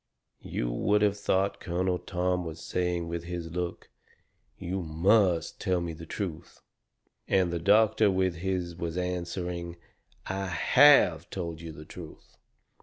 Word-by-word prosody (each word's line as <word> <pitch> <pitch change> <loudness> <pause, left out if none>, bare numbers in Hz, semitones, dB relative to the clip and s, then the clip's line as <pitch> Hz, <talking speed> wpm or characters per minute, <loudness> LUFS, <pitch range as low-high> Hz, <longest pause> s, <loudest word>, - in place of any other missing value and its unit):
You - - -2
would 105 +12 +2
of 100 -1 +3
thought 100 -1 0
Colonel 90 0 -1
Tom 90 0 -1
was 80 -1 -7
saying 90 -2 -2
with 85 0 -4
his 85 -2 -5
look: 90 0 -4 0.7
"You 95 +2 -3
MUST 85 +1 +2
tell 95 -3 +1
me 85 -1 -4
the 80 +1 -10
truth." 85 -4 -6 0.6
And 90 -3 +2
the 85 - -1
doctor 105 +3 +4
with 95 -2 +1
his 90 -1 -2
was 85 0 -4
answering: 90 -1 -3 0.5
"I 95 0 -3
HAVE 135 - +5
told 85 -3 -5
you 85 -1 -7
the 75 0 -11
truth." - - -12
90 Hz, 140 wpm, -28 LUFS, 85-95 Hz, 0.7 s, HAVE